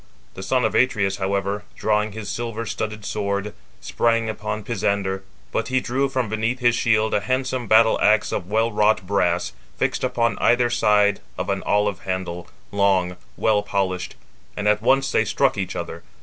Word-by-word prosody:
The - - -8
son 125 +6 +1
of - - 0
Atreus, 100 -6 +2
however, 100 +1 -1
drawing 105 -1 0
his 110 -2 -7
silver 115 +1 -4
studded 110 0 -4
sword, 100 0 -2 0.3
sprang 115 -1 +1
upon 110 0 -4
Pisander; 100 -4 -1 0.3
but - - -1
he 130 0 +1
drew 135 +3 -1
from 130 -3 -1
beneath 110 +4 -1
his 120 -1 +3
shield 110 -2 +2
a - - +3
handsome 130 +2 -2
battle 110 +1 +5
axe 105 +1 +3
of 90 - -3
well 110 +2 +1
wrought 105 -2 +2
brass, 90 -3 0 0.2
fixed - - -1
upon 115 0 0
either 120 0 +3
side 105 -3 +3 0.2
of - - -3
an - - -1
olive 105 -2 +1
handle, 95 -2 -4 0.2
long, 95 -3 +2 0.2
well 105 -2 +2
polished; 95 -3 -2 0.4
and 105 0 -1
at 105 0 +3
once 135 +3 +2
they - - +3
struck 135 -1 +1
each 95 -2 -3
other. 85 -1 -5
105 Hz, 170 wpm, -22 LUFS, 100-115 Hz, 0.4 s, battle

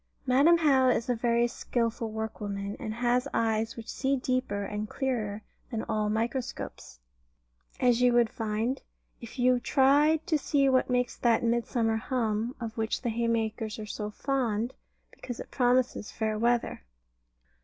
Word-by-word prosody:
Madam 280 +7 +5
How 270 -5 +4
is 240 -1 0
a - - +1
very 235 0 +2
skilful 230 -1 -2
workwoman, 205 -2 -4
and 215 - -4
has 245 +2 +1
eyes 225 0 0
which 225 - -8
see 270 +1 0
deeper 255 -6 -1
and 210 +1 -4
clearer 220 -6 -2 0.3
than 225 -3 -3
all 210 -1 -1
microscopes; 230 - -4 0.8
as 245 -1 +3
you 250 0 +5
would 240 -2 +3
find, 225 +4 -2 0.4
if 235 +2 -10
you 250 0 +3
tried 290 +5 +3
to 320 -5 +1
see 280 -1 +2
what 260 -1 +3
makes 250 0 0
that 235 -2 +2
"Midsummer 230 -1 +1
hum" 225 0 -1
of 230 -2 -5
which 220 +3 -1
the 240 - 0
haymakers 225 -1 -1
are 215 - -6
so 210 0 -4
fond, 240 -1 -1 0.4
because 245 -2 -8
it - - -8
promises 250 -3 +1
fair 220 -1 -1
weather. 235 - 0
235 Hz, 150 wpm, -28 LUFS, 220-255 Hz, 0.8 s, Madam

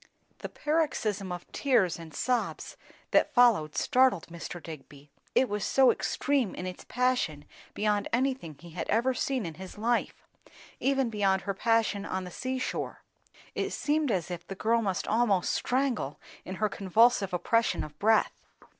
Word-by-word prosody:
The - - -6
paroxysm 235 - -1
of 175 -1 -5
tears 225 - +2
and 165 -1 -10
sobs 245 - -2 0.4
that - - +3
followed, 225 - +4
startled 255 - +3
Mr. 170 +1 -7
Digby; 145 -3 -11 0.2
it 260 - +4
was 210 -2 -3
so 265 -2 +5
extreme 275 -8 0
in 180 - -5
its 185 0 -6
passion 245 - 0 0.3
beyond 210 -1 +1
anything 250 - -1
he 170 +2 -13
had 170 +1 -5
ever 240 +4 +2
seen 255 -3 -1
in 165 - -5
his 190 +2 -9
life; 235 +3 -1 0.5
even 270 -3 +1
beyond 195 -3 +1
her 195 0 -2
passion 225 -1 +1
on 190 -2 -3
the 180 - -8
sea 260 +7 -3
shore. 255 - -4 0.5
It - - -2
seemed 300 -1 0
as 180 -5 -1
if 175 0 -6
the 195 - -6
girl 230 +4 +2
must 195 -4 -2
almost 210 -5 +2
strangle 250 - -1 0.3
in 185 - -5
her 215 +2 +1
convulsive 200 +1 +3
oppression 225 +6 +1
of 150 0 -10
breath. 220 +1 +3
210 Hz, 160 wpm, -29 LUFS, 180-250 Hz, 0.5 s, so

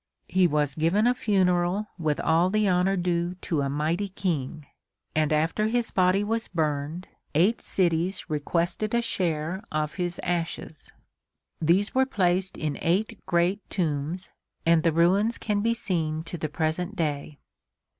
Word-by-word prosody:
He 185 -1 +3
was 150 -3 +1
given 170 - +2
a 245 - +4
funeral 190 -3 +1
with 155 -3 0
all 165 +3 +3
the 215 +1 +2
honor 185 +1 +2
due 175 0 0
to 155 -4 0
a 140 - -1
mighty 155 +7 -1
king 155 -7 -3 0.5
and 155 -1 +2
after 160 +8 +1
his 235 +1 0
body 185 +2 +3
was 225 +2 -1
burned, 155 +1 -2 0.3
eight 190 +9 +3
cities 175 +1 0
requested 170 +8 -1
a 235 - +3
share 175 -4 -1
of 150 -1 -1
his 175 -1 -1
ashes. 170 -3 -3 0.7
These 180 +6 +2
were 265 0 +3
placed 190 -5 +1
in 150 -2 -3
eight 200 +6 0
great 175 +3 +2
tombs, 165 0 -2 0.3
and 165 -1 +5
the 165 - +2
ruins 190 +8 +3
can 210 -2 -1
be 230 +2 +1
seen 160 -7 -1
to 165 +1 -6
the 155 - -2
present 165 +5 -2
day. 150 -3 -2
175 Hz, 150 wpm, -26 LUFS, 155-195 Hz, 0.7 s, and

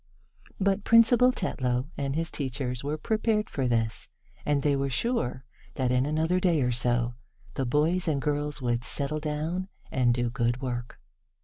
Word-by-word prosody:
But 200 0 +1
Principal 235 +2 +6
Tetlow 125 - -1
and 140 0 -2
his 165 +1 -2
teachers 130 -3 -3
were 150 +2 -2
prepared 215 +3 0
for 135 -3 0
this, 115 -2 0 0.4
and 145 -2 +2
they 145 -1 +3
were 140 0 0
sure 130 - -1 0.3
that, 130 -2 0
in 125 +2 +2
another 160 +4 +1
day 170 -6 +2
or 125 - +1
so, 120 0 +1 0.4
the 135 - -2
boys 160 +8 +1
and 150 -3 +1
girls 145 0 -2
would 120 -1 0
settle 145 +3 -2
down 155 +5 -2 0.2
and 125 -2 +3
do 120 0 0
good 120 0 0
work. 120 -2 -5
140 Hz, 165 wpm, -28 LUFS, 125-165 Hz, 0.4 s, Principal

